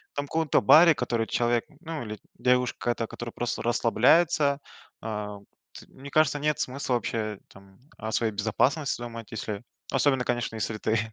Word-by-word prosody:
Там, 145 0 -2
в - - -21
ком-то 160 -3 +2
баре, 160 +9 +8
который 115 -5 -1
человек 120 -1 +1 0.2
ну 165 -5 -5
или 105 -2 -7 0.2
девушка, 125 -1 +1
та, 115 -1 -4
которая 120 -1 -7
просто 120 - -3
расслабляется, 140 +5 +3 0.4
э, 105 -2 -4 0.5
т - - -11
мне 140 +2 -11
кажется 155 -1 +3
нет 150 0 0
смысла 130 -1 -1
вообще, 110 -3 -2
там, 95 0 -18 0.2
о 110 0 -5
своей 110 -1 +1
безопасности 125 +8 0
думать. 115 -2 -7
Если 105 -1 -5 0.3
особенно, 135 -1 +2
конечно, 120 -2 -2
если 110 0 -3
ты 110 +1 0
120 Hz, 160 wpm, -27 LUFS, 110-140 Hz, 0.5 s, баре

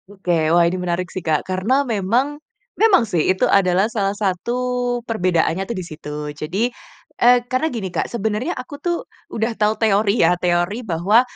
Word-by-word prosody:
Oke, 175 -6 0
wah 170 +1 +5
ini 180 +2 -1
menarik 180 0 -2
sih 185 - -4
Kak, 155 -3 0
karena 215 +10 +1
memang 240 +7 0 0.3
memang 405 - +4
sih 175 -7 0
itu 185 0 +2
adalah 185 0 +3
salah 205 -3 -1
satu 205 +4 -1 0.5
perbedaannya 185 -5 0
tuh 235 - -3
di 185 - -4
situ. 155 -2 -9 0.2
Jadi, 195 +12 -2 0.5
eee, 245 0 +5
karena 255 +6 0
gini 200 - -5
Kak, - - -1
sebenarnya 220 - -2
aku 255 +3 -8
tuh 345 -1 -2 0.2
udah 225 +1 -2
tahu 215 0 +1
teori 210 0 +2
ya, 175 - +4
teori 175 +5 0
bahwa, 200 +2 +3
200 Hz, 170 wpm, -20 LUFS, 180-235 Hz, 0.5 s, wah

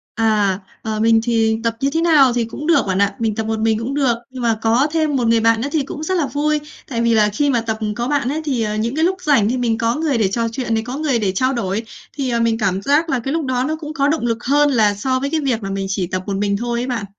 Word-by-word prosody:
À, 210 -4 +2 0.2
ờ, 215 -1 -3
mình 225 0 +4
thì 225 -2 +1
tập 230 0 0
như 275 +1 +1
thế 325 - 0
nào 295 -7 +5
thì 240 -1 0
cũng 290 +7 -7
được 335 - +4
bạn 190 0 0
ạ, 200 0 +2
mình 220 -2 -1
tập 220 - -2
một 220 0 -1
mình 220 -1 +1
cũng 250 +5 -3
được, 265 -5 +2 0.2
nhưng 255 -1 -7
mà 225 -2 +1
có 235 +6 +3
thêm 310 -3 0
một 240 -3 +1
người 230 0 +4
bạn 230 0 +3
nữa 275 - -2
thì 310 -3 +1
cũng 290 +3 -7
rất 375 +4 -1
là 295 - +1
vui. 300 +1 0 0.3
Tại 235 -3 -2
vì 230 -1 +3
là 210 -1 +4
khi 280 +8 0
mà 240 -3 +2
tập, 225 -1 -3
ừm, 210 -1 -2
có 240 +3 -3
bạn 285 -4 0
ấy, 310 +3 -2
thì, 260 -6 -1
ờ, 210 -1 -2
những 230 +4 -2
cái 320 - +2
lúc 375 +1 0
rảnh 265 -9 +3
thì 255 - 0
mình 230 -2 0
có 230 +1 +1
người 300 -6 0
để 205 -3 +2
trò 230 +3 -1
chuyện 240 -2 -2
này, 220 - 0
có 255 +2 -4
người 285 -6 +1
để 195 -4 0
trao 255 +7 +1
đổi, 215 -2 -2 0.3
thì, 270 -3 -3
ờ, 235 0 0
mình 230 -1 +1
cảm 195 -3 0
giác 300 +7 +2
là 265 - +1
cái 270 +4 -3
lúc 325 -2 -1
đó 255 0 0
nó 310 +2 -1
cũng 310 -1 -7
có 280 -1 +1
động 315 +1 0
lực 230 0 -2
hơn 290 +2 +3
là 215 -5 +3
so 255 +5 -1
với 280 +1 -2
cái 320 - 0
việc 245 -6 -1
là 195 - -4
mình 195 0 -2
chỉ 190 -2 -1
tập 185 +1 -3
một 195 -1 -2
mình 200 0 0
thôi 235 +2 -2
ấy 250 - -2
bạn. 240 -5 -3
235 Hz, 315 wpm, -19 LUFS, 220-280 Hz, 0.3 s, nào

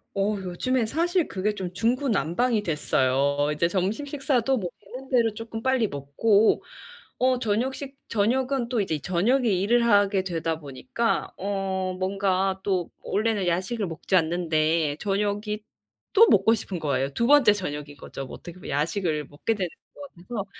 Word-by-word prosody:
어 200 +2 +1
요즘에 220 +7 -1
사실 340 - +1
그게 205 +2 -2
좀 185 -3 -5
중구난방이 230 - +1
됐어요. 140 -3 +1
이제 150 +3 +1
점심 195 +9 -1
식사도 270 -3 0
뭐 185 -6 -3
되는대로 245 +1 -1
쪼끔 225 0 -7
빨리 260 -4 +2
먹고. 200 +10 +2 0.5
어 255 0 +2
저녁 230 +3 0
식 275 0 -8
저녁은 250 +4 +1
또 240 -2 0
이제 160 -7 -1
저녁에 220 - +1
일을 210 +5 +2
하게 205 -3 +3
되다 165 -3 -2
보니까 225 - -2
어 190 -1 -2
뭔가 190 0 0
또 185 -4 -1
원래는 210 -2 0
야식을 190 +5 -1
먹지 165 +3 -2
않는데 160 -3 +1
저녁이 205 +1 -1 0.5
또 455 +2 +7
먹고 225 - +5
싶은 200 -4 -3
거예요. 140 -3 0
2 235 - 0
번째 285 -5 +7
저녁인 150 -7 -5
거죠, - - -8
어떻게 175 - -9
보면. - - -9
야식을 155 +1 -1
먹게 185 +10 -2
되는 190 -3 -1 0.3
것 - - -12
같아서. 200 +3 -6
200 Hz, 310 characters per minute, -25 LUFS, 175-235 Hz, 0.5 s, 또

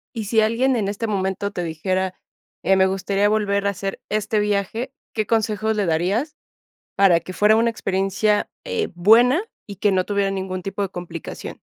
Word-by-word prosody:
Y 220 -2 -3
si 220 +2 +2
alguien 245 +4 +2
en 205 -4 -1
este 210 +3 -3
momento 195 -1 -1
te 180 - -3
dijera: 185 +3 -2 0.5
"Eh, 195 - +3
me 190 0 +5
gustaría 195 +1 +1
volver 200 -1 +1
a - - +3
hacer 195 0 -5
este 215 0 0
viaje", 210 +4 -1 0.2
¿qué 215 -2 -1
consejo 220 -1 +1
le 210 -3 0
darías 200 - 0 0.6
para 190 -4 +5
que 185 +2 -9
fuera 210 +3 +4
una 230 +1 +3
experiencia, 195 0 0
eh, 470 -3 -1
buena 235 - +5 0.2
y 200 - -7
que 205 +2 +2
no 185 -1 +1
tuviera 200 -1 0
ningún 190 -1 -4
tipo 195 +2 -4
de 195 - -1
complicación? 175 -2 -7
200 Hz, 180 wpm, -22 LUFS, 190-220 Hz, 0.6 s, me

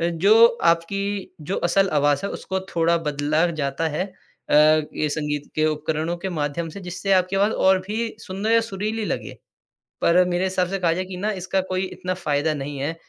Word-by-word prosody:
अ, - - 0
जो 200 +7 +6 0.2
आपकी 195 +4 0
जो 160 +6 -3
असल 195 +3 +3
आवाज 145 -1 +2
है 200 - -1
उसको 190 0 -4
थोड़ा 170 0 +3
बदला 150 +3 +1
जाता 140 +3 -1
है 155 +4 -2
अ, 190 -1 -13
ये 155 0 +3
संगीत 150 -1 -3
के 155 - +1
उपकरणों 155 +2 -1
के 190 +2 -4
माध्यम 150 +3 -2
से 180 +5 -9
जिससे 180 +2 -3
आपकी 185 +1 +2
आवाज 205 +3 +3 0.2
और 190 0 +5
भी 225 +2 -3
सुंदर 200 +3 -3
या 230 - +6
सुरीली 215 0 -3
लगे। - - -3 0.7
पर 180 +2 +5
मेरे 180 0 0
हिसाब 185 -1 0
से 195 +1 -3
कहा 175 -2 +2
जाए 185 +2 -3
कि 185 -1 -7
ना 210 +3 -1
इसका 190 +1 0
कोई 185 0 0
इतना 185 0 -4
फ़ायदा 155 -3 0
नहीं 145 0 -5
है, 150 +4 -2
180 Hz, 195 wpm, -23 LUFS, 155-195 Hz, 0.7 s, जो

